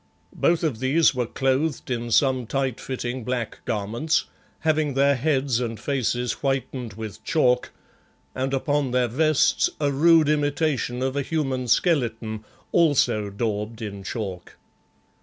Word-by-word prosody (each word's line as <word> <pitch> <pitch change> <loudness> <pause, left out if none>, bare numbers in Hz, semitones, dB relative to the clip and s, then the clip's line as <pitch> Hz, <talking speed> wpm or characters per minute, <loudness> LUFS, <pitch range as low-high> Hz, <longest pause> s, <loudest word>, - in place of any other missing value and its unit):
Both 170 0 +2
of 140 -9 -1
these 145 +6 +3
were 125 -3 -1
clothed 135 +3 -1
in 120 -1 -2
some 130 0 +2
tight 135 -2 -1
fitting 130 -1 -4
black 125 -1 -3
garments, 115 +9 0 0.4
having 155 -3 +1
their 140 +1 +4
heads 135 -2 +1
and 115 -3 -3
faces 125 -2 -1
whitened 130 -4 -2
with 110 +1 -8
chalk 125 -1 +2 0.6
and 130 +1 -2
upon 140 +1 0
their 125 0 +2
vests 155 +5 +2
a 145 -2 +1
rude 160 +2 +5
imitation 145 -4 0
of 135 0 -1
a 140 - +1
human 135 -4 -2
skeleton, 115 - +1 0.3
also 125 -10 +3
daubed 105 +1 -3
in 100 -2 -6
chalk. 95 -4 -6
130 Hz, 135 wpm, -24 LUFS, 115-145 Hz, 0.6 s, rude